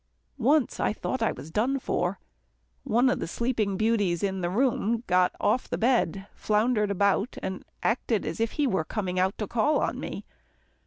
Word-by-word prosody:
Once 275 +2 +2
I - - +1
thought 260 +3 -3
I 225 - +2
was 155 - -9
done 245 +9 +1
for. 190 -7 -1 0.6
One 240 +4 +3
of 255 - +1
the - - -3
sleeping 215 -1 -1
beauties 205 -6 +1
in 190 -1 -1
the 175 - 0
room 235 +1 +1
got 180 0 +2
off 255 - +1
the - - -1
bed, 220 -6 +1
floundered 215 0 +1
about, 200 +3 +1
and 190 0 -4 0.2
acted 225 -2 0
as - - -4
if 225 0 0
he 295 - +1
were 190 -11 +1
coming 185 +1 -3
out 190 +2 +1
to 215 - -2
call 240 +9 +1
on - - -1
me. - - -6
215 Hz, 180 wpm, -27 LUFS, 190-240 Hz, 0.6 s, One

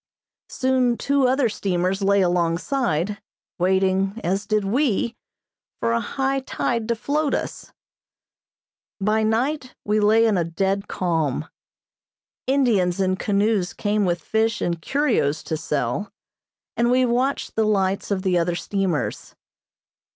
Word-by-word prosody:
Soon 255 -2 +1
two 280 -2 +2
other 260 0 +2
steamers 190 -2 -1
lay 200 0 +3
alongside, 180 - 0 0.4
waiting, 190 +3 +1
as 195 +3 -1
did 215 -1 +1
we, 235 0 0 0.6
for 115 - 0
a 115 - +2
high 270 - -1
tide 235 -3 -2
to 235 - +1
float 290 +6 0
us. - - -5 1.3
By 215 +2 +1
night 255 +5 -1
we 210 +1 +2
lay 220 +2 +4
in 215 -4 +2
a - - +2
dead 195 +4 -1
calm. 160 -4 -1 1.0
Indians 225 -10 +2
in 185 -1 +2
canoes 200 -1 0
came 210 0 0
with 175 -2 0
fish 220 0 0
and 170 -1 -2
curios 230 - 0
to 160 - -3
sell, 150 - -2 0.6
and 235 0 +2
we 255 +1 +4
watched 250 +3 -1
the 220 - +2
lights 195 -2 0
of 195 -2 -1
the 180 -3 +2
other 170 0 0
steamers. 190 -4 -2
205 Hz, 130 wpm, -23 LUFS, 180-235 Hz, 1.3 s, lay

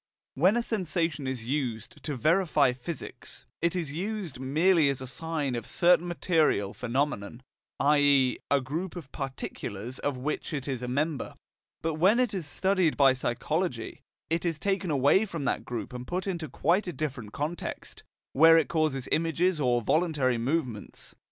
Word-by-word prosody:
When 185 - +3
a 240 - +1
sensation 165 - -1
is 130 -4 -4
used 120 -5 -3
to 150 - -2
verify 155 - +3
physics, 130 +5 -8 0.2
it 170 +1 +1
is 165 -6 -3
used 185 - -4
merely 155 +4 +3
as 140 - -2
a 130 - -6
sign 150 0 -2
of 120 -2 -3
a - - -12
certain 175 0 +3
material 160 - +1
phenomenon, 125 -2 -2 0.4
i.e. 140 -3 +4
of 140 - +4
a - - -1
group 160 +9 -4
of 160 -7 -8
particulars 130 -4 -5
of 145 -2 -2
which 150 +4 -3
it 140 -2 -4
is 130 -3 -3
a 125 - -4
member. 145 +4 -2 0.5
But 160 -1 -1
when 205 +7 +5
it 250 -4 +2
is 180 -6 -3
studied 185 +1 +1
by 135 -2 +6
psychology, 130 +1 -2 0.3
it 165 +1 -1
is 165 -3 -1
taken 195 +1 -1
away 145 +7 +4
from 165 -8 -5
that - - -1
group 120 0 -5
and 125 0 -7
put 180 +1 -2
into 170 -5 -3
quite 185 +4 +1
a 175 - -3
different 130 -9 -4
context, 155 +7 -5 0.3
where 165 +3 +7
it 160 - +2
causes 155 -5 0
images 165 +2 +1
or 120 -4 +2
voluntary 145 -6 +1
movements. 125 -4 -3
150 Hz, 170 wpm, -28 LUFS, 130-170 Hz, 0.5 s, where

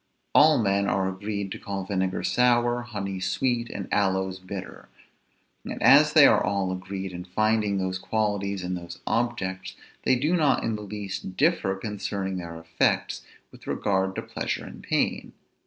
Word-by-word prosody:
All 155 0 +7
men 100 -2 +1
are 95 -1 +1
agreed 100 +1 -4
to - - -5
call 100 -1 -4
vinegar 95 -1 -1
sour, 120 0 +3
honey 100 -5 -5
sweet, 120 +5 0
and 100 - -5
aloes 95 -2 +1
bitter; 95 0 -8 0.7
and - - -6
as - - +7
they - - +8
are - - +5
all 100 -2 0
agreed 95 +1 -5
in 90 0 -6
finding 105 +2 +1
those 95 -1 -2
qualities 100 -2 -1
in 90 +1 -3
those 85 -1 -7
objects, 100 -6 -2 0.3
they 130 - +3
do 150 +8 +1
not 150 -6 +2
in 115 - -1
the 105 - -6
least 100 -2 -6
differ 150 - +2
concerning 100 -1 -4
their 85 -2 -6
effects 80 0 0 0.3
with - - -16
regard 95 -1 0
to - - -3
pleasure - - -3
and - - -10
pain. - - -1
100 Hz, 160 wpm, -26 LUFS, 95-110 Hz, 0.7 s, they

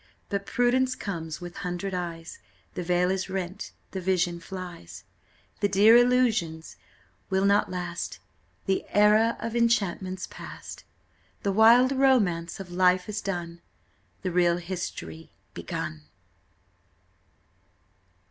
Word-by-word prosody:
But 200 -1 -3
prudence 255 +1 +2
comes 165 -8 -5
with 175 -1 -9
hundred 180 +1 -4
eyes, 170 -2 -5 0.3
The - - -4
veil 180 +1 +1
is 190 0 -2
rent, 185 +1 -4 0.2
the 190 - -4
vision 175 -1 0
flies, 180 - -9 0.6
The 205 - +2
dear 205 +4 +6
illusions 240 -10 +2 0.5
will 190 0 +1
not 200 +1 +3
last, 175 -1 -4 0.5
The 190 -1 0
era 210 +2 +4
of 230 +1 -4
enchantment's 195 -5 0
past: - - -10 0.6
The 200 - +1
wild 230 +5 +6
romance 220 -13 +2
of 185 -2 -8
life 180 0 +3
is 210 0 -3
done, 170 -3 -5 0.6
The 185 - -1
real 175 -1 +3
history 170 - -6 0.2
begun!" 75 -1 -5
185 Hz, 115 wpm, -27 LUFS, 175-210 Hz, 0.6 s, dear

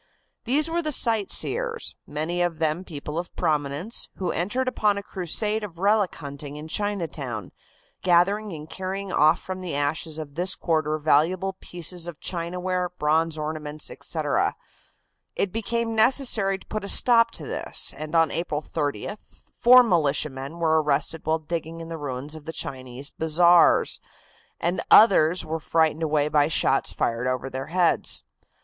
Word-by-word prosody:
These 290 +6 +2
were 335 +1 -1
the 310 -2 -2
sightseers, 295 - 0
many 160 +4 -2
of 175 -2 0
them 160 +2 0
people 150 -2 -6
of 175 - -7
prominence, 155 +5 -1
who 185 - -2
entered 240 +10 -1
upon 210 -5 +1
a 200 - -4
crusade 210 +4 0
of 180 -5 -8
relic 200 +1 +2
hunting 140 -1 -8
in 150 +1 -8
Chinatown, 160 - -3 0.5
gathering 195 +4 +2
and 155 -2 -8
carrying 190 +2 -5
off 150 +1 +4
from 185 0 -6
the 175 -5 -4
ashes 150 +2 -2
of 155 -3 -7
this 180 +4 0
quarter 155 -2 0
valuable 165 +6 +2
pieces 175 0 -4
of 170 -3 -8
chinaware, 180 +1 -2
bronze 160 -1 0
ornaments, 155 -1 -5
etc. - - -1 0.8
It 200 - 0
became 225 +1 -2
necessary 220 -4 +2
to - - -18
put 215 -2 -5
a 200 - -4
stop 230 -2 +6
to - - -7
this, - - 0
and 155 +1 -6
on 165 -2 +4
April 155 -3 -2
30th 150 +8 -3 0.3
four 250 +1 +7
militiamen 150 - 0
were 160 -2 +2
arrested 150 +2 -1
while 160 0 +2
digging 165 +1 -5
in 165 0 -8
the 165 - -5
ruins 140 +1 -5
of 155 -2 -10
the 160 - -6
Chinese 130 0 -6
bazaars, 170 +2 +4 0.6
and 175 +2 -1
others 180 -5 +6
were 160 +1 -3
frightened 160 0 +1
away 150 -2 +1
by 150 -1 +3
shots 160 - +1
fired 115 +2 -1
over 130 +1 -2
their 130 +1 -5
heads. 175 +1 +1
165 Hz, 155 wpm, -25 LUFS, 150-195 Hz, 0.8 s, four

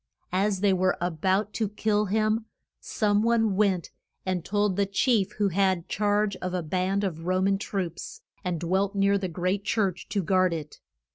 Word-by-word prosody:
As 195 0 +1
they 200 -2 +4
were 185 0 +1
a 175 +1 -1
bout 190 +6 0
to 220 -3 -1
kill 210 0 0
him, 215 +2 +1 0.3
some 205 -1 +1
one 225 -3 +2
went 190 -4 +1 0.3
and 185 -2 -1
told 205 -1 0
the 200 0 +1
chief 205 0 +1
who 205 -2 +1
had 190 -2 +1
charge 205 -1 +1
of 185 0 -4
a 180 - -1
band 185 +5 0
of 165 -3 -3
Ro 185 0 +2
man 195 +1 +2
troops, 185 -5 -5 0.2
and 180 -3 -2
dwelt 190 +4 0
near 200 0 +3
the 190 - -2
great 185 +3 -1
church 195 -5 -1
to 200 -2 -1
guard 185 0 +2
it. 150 -2 -7
195 Hz, 185 wpm, -27 LUFS, 185-205 Hz, 0.3 s, they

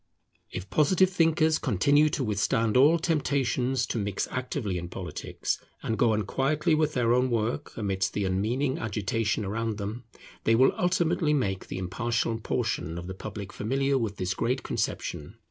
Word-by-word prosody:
If 95 - -6
Positivist 185 +4 +3
thinkers 160 -2 +3
continue 145 +6 +3
to 140 - -1
withstand 110 +1 +1
all 145 +6 +6
temptations 135 -6 0
to 115 - -2
mix 100 -1 -2
actively 125 -7 -2
in 85 0 -6
politics, - - -4 0.2
and 110 - -1
go 115 -1 +3
on 105 0 0
quietly 150 - +1
with 155 0 +2
their 120 -2 +3
own 125 +1 +2
work 120 +5 -2
amidst 95 -3 -1
the 105 - -1
unmeaning 115 +9 0
agitation 110 0 -1
around 110 +2 -2
them, 110 +4 -5 0.4
they 115 - +4
will 130 +3 +5
ultimately 175 -3 +1
make 95 -9 -1
the - - -5
impartial 115 +4 -1
portion 85 -6 -2
of 85 - -6
the 95 - -5
public 100 0 -7
familiar 135 +5 0
with 110 -6 -1
this 90 0 -1
great 125 +7 -1
conception. - - -3
120 Hz, 165 wpm, -27 LUFS, 105-145 Hz, 0.4 s, all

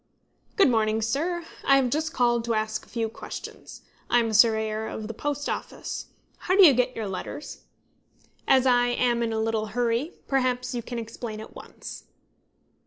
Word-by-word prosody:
"Good 395 - +6
morning, 220 -1 +2
sir. 330 +9 -1 0.2
I 275 - +5
have 260 -3 +2
just 315 +3 0
called 240 -3 +2
to 230 -1 0
ask 215 0 -1
a - - -19
few 230 -2 -1
questions. 220 - -9 0.3
I - - +4
am 230 -1 +2
a - - -3
surveyor 220 0 +3
of 215 - -5
the 225 - -5
Post 290 +4 -3
Office. - - -5 0.3
How 370 - +1
do 390 -1 +9
you 295 - +8
get 250 +1 +1
your 220 -2 -3
letters? 195 +9 -7 0.8
As 265 -1 +5
I 245 -1 +4
am 245 -1 +1
a 235 - +1
little 220 0 0
in - - -9
a - - -12
hurry, 245 +6 0
perhaps 255 -1 0
you 240 - -2
can 240 +1 -6
explain 230 -1 -6
at 220 - -10
once." - - -10
240 Hz, 185 wpm, -26 LUFS, 220-265 Hz, 0.8 s, do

